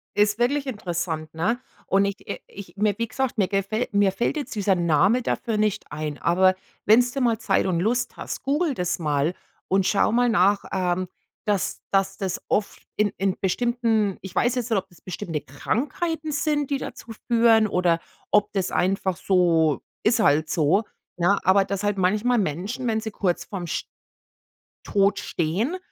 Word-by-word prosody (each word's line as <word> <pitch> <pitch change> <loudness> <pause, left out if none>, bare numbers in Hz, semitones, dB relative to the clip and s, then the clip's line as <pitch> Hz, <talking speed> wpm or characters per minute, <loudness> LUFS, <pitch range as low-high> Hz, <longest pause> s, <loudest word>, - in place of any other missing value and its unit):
Ist 210 +1 +2
wirklich 275 +4 +1
interessant, 170 - -3
ne? 215 +10 0 0.3
Und 195 +1 +3
ich 200 0 -3
i - - -4
ich 190 -3 -11
mir 210 0 +2
wie 230 - -1
gesagt, 265 +1 -2
mir 195 -3 +2
gefäll 200 +4 -1
mir 200 -1 +3
fällt 240 +9 -1
jetzt 285 - -5
dieser 200 -2 +2
Name 175 +7 +3
dafür 230 -2 -2
nicht 210 -2 0
ein, 150 0 -4
aber 185 +2 +3 0.3
wenn's 245 +3 +5
du 275 - -3
mal 230 -3 +2
Zeit 195 -4 +1
und 180 -3 0
Lust 240 +6 0
hast, - - -5
google 290 +2 +1
das 180 -3 -2
mal 150 +1 0 0.3
und 190 0 +2
schau 210 - +2
mal 245 +1 +3
nach, 200 -1 +3
ähm, 185 -1 0 0.4
dass 205 -3 -1
dass 195 -1 +1
das 190 -2 -3
oft 205 - -1
in 210 0 +2
in 195 -1 0
bestimmten 225 0 +1
ich 190 -2 -9
weiß 245 +1 +2
jetzt 250 -1 -2
nicht, 215 - +3
ob 190 0 -11
das 175 - -21
bestimmte 175 -4 -4
Krankheiten 305 - -2
sind, 295 -1 0
die 280 - +2
dazu 230 - -8 0.2
führen, 230 -2 +5
oder 175 -4 +2 0.3
ob 210 0 +3
das 190 -3 -1
einfach 190 0 0
so 165 -5 +2 0.2
ist 230 +2 +3
halt 155 -6 +3
so, 170 +6 +2 0.3
ne, 180 +3 +3
aber 195 +1 +4
dass 200 0 -3
halt 205 -1 0
manchmal 210 +7 +2
Menschen, 200 - -2
wenn 220 -1 +1
sie 220 -1 -5
kurz 180 -4 -1
vorm 185 -4 -6
sch - - -2 1.0
Tod 200 0 +2
stehen, 195 - -1
200 Hz, 180 wpm, -24 LUFS, 180-230 Hz, 1.0 s, wenn's